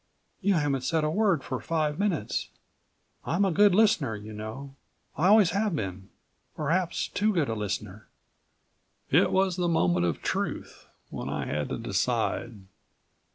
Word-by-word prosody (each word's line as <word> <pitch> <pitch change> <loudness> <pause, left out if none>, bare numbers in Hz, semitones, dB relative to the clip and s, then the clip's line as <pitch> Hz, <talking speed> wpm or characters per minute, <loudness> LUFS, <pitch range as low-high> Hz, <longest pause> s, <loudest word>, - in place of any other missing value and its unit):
"You 200 0 +2
haven't 145 -4 0
said 160 +3 0
a 155 - +1
word 190 -6 +2
for 130 -2 -4
five 155 +1 -1
minutes. 180 - -1 0.7
I'm 175 +6 +1
a 190 - +1
good 200 +2 +5
listener, 205 - +3
you 105 +1 -9
know. 110 +6 -7 0.4
I 170 - +2
always 205 -3 +6
have 200 -2 0
been 95 -6 -5 0.5
perhaps 170 +3 0
too 215 +2 +1
good 165 - 0
a - - 0
listener." 105 -1 -5 1.0
It - - +4
was 190 -1 +2
the 175 -1 0
moment 90 - +2
of 85 - -3
truth, - - -3 0.2
when - - -5
I 70 -1 -3
had 75 +1 -2
to - - -3
decide. 115 -4 -1
155 Hz, 155 wpm, -27 LUFS, -, 1.0 s, always